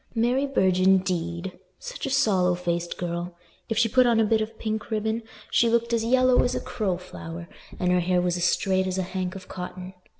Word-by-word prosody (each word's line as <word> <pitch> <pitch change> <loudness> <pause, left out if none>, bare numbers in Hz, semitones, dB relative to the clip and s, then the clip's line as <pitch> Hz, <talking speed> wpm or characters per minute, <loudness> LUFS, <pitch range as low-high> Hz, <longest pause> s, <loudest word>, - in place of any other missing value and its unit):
"Mary 245 +5 +1
Burge, 190 -9 +2
indeed! 185 -1 +1 0.2
Such - - -6
a - - -2
sallow 195 -10 +2
faced 175 -1 -3
girl: 175 0 -4 0.3
if 225 - -1
she 225 - +4
put 255 +2 +4
on 230 -2 +3
a - - +5
bit 220 +1 +2
of 220 +1 -5
pink 215 -1 -3
ribbon, 220 +1 -1 0.3
she 235 - +4
looked 235 0 +1
as 230 -1 +1
yellow 255 +1 +4
as 250 - 0
a - - 0
crow 205 -7 -2
flower 170 -2 -9 0.3
and 180 0 +1
her 180 - +3
hair 180 +1 +1
was 175 -1 0
as 175 0 0
straight 190 +1 +1
as 185 0 -2
a 190 - 0
hank 185 0 -4
of 185 -1 -9
cotton." 185 0 -7
190 Hz, 210 wpm, -25 LUFS, 180-230 Hz, 0.3 s, a